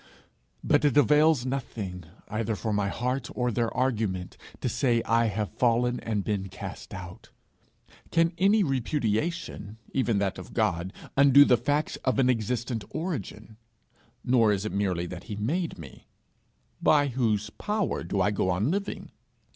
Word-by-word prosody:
But 145 0 +3
it 145 -1 +3
avails 150 -2 +4
nothing, 105 -9 -4 0.2
either 110 0 -2
for 110 0 -2
my 105 -1 +1
heart 125 +2 -2
or 125 -1 0
their 115 0 0
argument, 110 -8 -1 0.2
to - - -2
say 120 -4 +1
I 115 0 +2
have 105 -1 -2
fallen 120 0 +2
and 105 -3 -2
been 95 -2 -2
cast 95 - -8
out: 90 -1 -9 0.8
can 165 +1 +2
any 200 +3 +4
repudiation, 135 - -2 0.2
even 120 -5 +1
that 100 -1 -1
of - - -11
God, 85 +2 0 0.2
undo 140 +1 +7
the 125 - +5
facts 145 +6 -1
of 130 - -1
an 130 -1 +4
existent 120 0 -2
origin? 110 - -5 0.7
Nor 120 -4 +4
is 100 0 -1
it 110 - -2
merely 95 -3 -1
that 90 +1 -8
he 110 - -5
made 155 - -2
me: 70 -6 -12 0.7
by 145 -2 +4
whose 110 -4 0
power 210 - -2
do 95 +3 -1
I 105 - +2
go 95 -2 0
on 95 - +1
living? 200 +2 -4
115 Hz, 155 wpm, -27 LUFS, 105-135 Hz, 0.8 s, undo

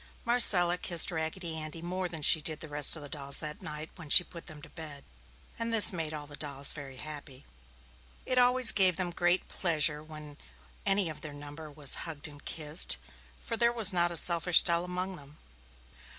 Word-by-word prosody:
Marcella 180 -7 +3
kissed 170 -2 +1
Raggedy 160 +1 -6
Andy 155 +1 -9
more 180 +2 -6
than 160 -3 -9
she 160 - +5
did 155 0 -5
the 160 - -10
rest 145 0 +3
of 155 - -10
the - - -10
dolls 140 -1 +1
that 150 -1 -6
night, 150 +1 -9
when 160 -4 -13
she 175 - +7
put 170 -1 -15
them 155 -3 -12
to - - -14
bed, 150 -4 -12 0.6
and 230 0 -4
this 220 -3 +6
made 160 -3 -5
all 150 -1 -8
the 145 0 -11
dolls 140 -2 +1
very 135 -3 -11
happy. 145 -2 -11 0.8
It 255 -1 0
always 250 -1 +6
gave 190 -3 +4
them 180 0 -4
great 175 +1 -2
pleasure 150 -4 -2
when 150 -1 -13 0.5
any 195 -1 +1
of 155 - -9
their 150 -2 -10
number 145 +2 -12
was 145 -1 +1 0.2
hugged 155 -1 -2
and 145 -1 -15
kissed, 155 +1 0 0.5
for 230 - -5
there 235 +1 +1
was 225 -5 +3
not 175 -1 +1
a 170 - -2
selfish 170 0 +3
doll 170 0 -1
among 180 +1 -7
them. 145 +1 -17
160 Hz, 195 wpm, -28 LUFS, 150-180 Hz, 0.8 s, she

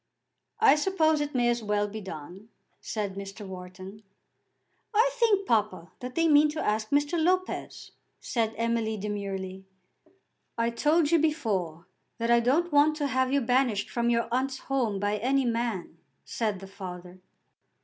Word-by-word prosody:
"I 440 -2 +7
suppose 315 -2 +2
it 295 -1 -3
may 240 -1 +3
as 240 0 +1
well 210 -1 0
be 215 +1 -7
done," 185 +3 -9 0.3
said 205 -3 -3
Mr. 200 +1 -8
Wharton. 185 +2 -9 0.9
"I 465 +4 +4
think, 445 -5 +2
papa, 195 -7 0
that 250 0 -7
they 330 0 +3
mean 300 0 +6
to 310 - -4
ask 215 -4 -1
Mr. 290 +3 +1
Lopez," 370 +2 -1 0.3
said 225 -2 -1
Emily 230 -1 0
demurely. 195 -2 -4 0.9
"I 230 0 +1
told 300 +6 +2
you 335 - +5
before 205 - -1 0.3
that 230 0 0
I 235 - +6
don't 295 +9 +1
want 295 +1 +5
to 300 -1 -2
have 260 -1 +1
you 280 0 +2
banished 245 -4 +1
from 235 0 0
your 235 0 +1
aunt's 260 +2 0
home 245 -9 -1
by 205 +1 0
any 265 +5 +1
man," 230 -8 -2 0.3
said 210 -5 -2
the 195 - -9
father. 180 -2 -9
230 Hz, 155 wpm, -28 LUFS, 200-290 Hz, 0.9 s, I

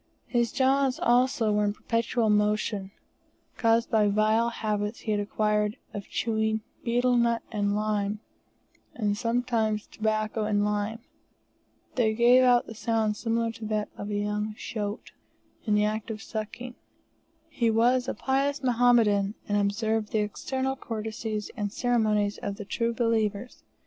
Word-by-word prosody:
His 235 -2 0
jaws 270 0 +2
also 240 -2 +3
were 210 0 +2
in 205 0 +1
perpetual 230 0 0
motion, 210 -1 +1 0.7
caused 230 0 +2
by 215 -2 +4
vile 215 +3 +2
habits 210 -1 -3
he 215 - -3
had 210 - +1
acquired 210 +1 0 0.2
of 200 -2 -6
chewing 220 -1 0 0.2
betel 245 +1 +2
nut 235 -1 +2
and 205 -2 0
lime, 210 -1 -1 0.8
and 205 -3 0
sometimes 230 -2 0
tobacco 215 0 -1
and 205 -1 +1
lime. 210 +2 -2 0.9
They 220 -3 +1
gave 240 +2 +6
out 245 -1 +4
a - - -7
sound 220 -1 0
similar 230 +1 -1
to 225 -1 -9
that 215 -1 -1
of 205 - -6
a 205 - -2
young 210 +1 -2
shoat, 210 -1 -5 0.5
in 210 -2 +2
the 210 0 +3
act 215 +1 -2
of 220 -1 -5
sucking. 230 +3 -6 0.7
He 235 -2 0
was 245 +3 +3
a - - -2
pious 275 +1 0
Mohammedan, 230 -5 +3
and 205 - 0
observed 210 +1 0
the 215 - +2
external 265 +5 -2
courtesies 220 -2 -4
and 205 -3 -3
ceremonies 215 -4 +1
of 200 - -4
the 205 0 -8
true 230 +3 -1
believers. 225 -1 -1
220 Hz, 145 wpm, -27 LUFS, 210-235 Hz, 0.9 s, gave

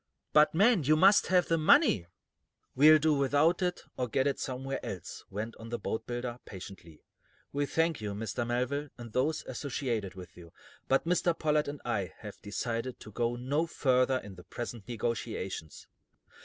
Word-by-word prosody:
"But, 150 +1 +5
man, 205 +2 +5
you 155 +3 +4
must 195 +6 +5
have 180 -1 +3
the 165 0 +2
money!" 155 - +4 0.7
"We'll 155 +3 +7
do 155 +1 +2
without 145 +6 +2
it, 180 -1 -1 0.2
or 125 - -1
get 130 +3 +1
it 140 -1 0
somewhere 135 +1 -4
else," 90 -4 -7
went 105 +4 -5
on 115 0 -10
the 120 - -2
boatbuilder, 120 +2 -4
patiently. 90 -4 -11 0.5
"We 145 0 0
thank 165 -4 0
you, 105 -1 -4
Mr. 115 +2 -3
Melville, 125 +5 -1
and 120 -3 -10
those 150 +5 0
associated 120 -7 -3
with 90 -2 -11
you, 85 -2 -14 0.3
but 135 +3 +2
Mr. 175 -1 +1
Pollard 150 -1 +1
and 145 0 -5
I 100 -8 -2
have - - -10
decided 115 +4 -3
to 110 - -11
go 120 +2 -1
no 140 +7 -1
further 130 -4 +2
in 100 -5 -8
the 90 -1 -13
present 115 +2 -7
negotiations." 110 -7 -4
125 Hz, 170 wpm, -30 LUFS, 110-150 Hz, 0.7 s, We'll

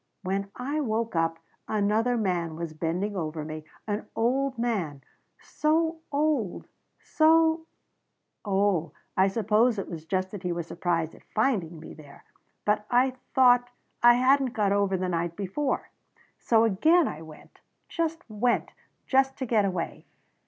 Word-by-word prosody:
"When 195 +1 -2
I 280 +5 -2
woke 225 -4 -1
up 165 0 +1 0.3
another 215 +3 +1
man 175 -6 -1
was 165 -1 -5
bending 175 +6 -2
over 155 -3 -3
me 155 0 -7 0.2
an 210 0 -3
old 260 +3 0
man 190 - -2 0.4
so 320 +1 0
old 285 - 0 0.3
so 320 +1 +3 0.8
"Oh, 195 -6 +1 0.2
I 190 +1 +4
suppose 220 +3 +2
it 195 - -3
was 160 -2 -7
just 185 +1 -1
that 205 - -7
he 180 -2 -2
was 170 -1 -3
surprised 170 -2 -1
at - - -16
finding 195 -9 0
me 155 - -10
there. 145 -2 -15 0.4
But 210 0 +1
I 250 +2 +3 0.2
thought 245 -1 +5 0.3
I 240 0 +7
hadn't 260 0 +3
got 205 -3 +1
over 200 -1 +2
the 185 0 -2
night 170 -1 -2
before 205 +9 -2 0.5
"So 225 -1 +3
again 310 - +4
I 150 - -6
went. 155 -1 -14 0.3
Just 330 0 -3
went. 235 +2 0 0.3
Just 270 0 +2
to 265 - -3
get 220 -4 +2
away. 180 -3 -4
210 Hz, 145 wpm, -27 LUFS, 175-250 Hz, 0.8 s, I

